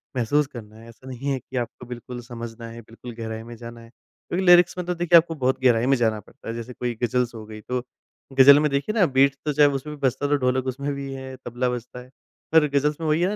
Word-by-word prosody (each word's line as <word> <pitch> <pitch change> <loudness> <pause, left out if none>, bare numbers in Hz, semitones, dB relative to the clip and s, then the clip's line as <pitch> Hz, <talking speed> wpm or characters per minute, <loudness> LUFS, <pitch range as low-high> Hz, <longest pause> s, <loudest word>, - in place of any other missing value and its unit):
महसूस 140 +5 +1
करना 110 -5 -11
है। 115 +1 -14
ऐसा 125 +3 -16
नहीं 130 +2 -5
है 135 - -1
कि 130 - -8
आपको 120 +1 -5
बिल्कुल 125 0 -8
समझना 115 -1 -8
है, 115 +1 -10
बिल्कुल 115 +2 -11
गहराई 110 -1 -6
में 120 +1 -10
जाना 115 0 -10
है। 115 - -15
क्योंकि 175 +9 -6
लीरिक्स 175 0 +6
में 180 - -3
तो 180 - -1
देखिए 175 0 +5
आपको 165 0 +2
बहुत 130 -2 0
गहराई 120 -2 +4
में 135 +1 +4
जाना 110 -3 +1
पड़ता 105 - -16
है। 115 - -3
जैसे 120 +2 -7
कोई 120 0 -3
गज़ल्स 120 +1 0
हो 110 -1 -8
गई 110 0 -10
तो 125 +3 -3 0.5
गज़ल 140 +2 +8
में 150 - +2
देखिए 140 +10 -1
ना 185 - +6
बीट्स 135 -1 +3
तो 150 - 0
चाहे 145 0 +5
उसमें 145 +2 -4
भी - - -17
बजता 135 +3 -2
तो 145 - +2
ढोलक 130 0 0
उसमें 140 +3 -3
भी 140 -1 -6
है, 130 0 -8
तबला 120 +1 -1
बजता 125 0 -6
है। 125 +1 -13 0.4
पर 160 -2 +5
गज़ल्स 145 +2 0
में 160 - -2
वही 155 +2 +2
है 190 +4 +1
130 Hz, 255 wpm, -23 LUFS, 120-145 Hz, 0.5 s, गज़ल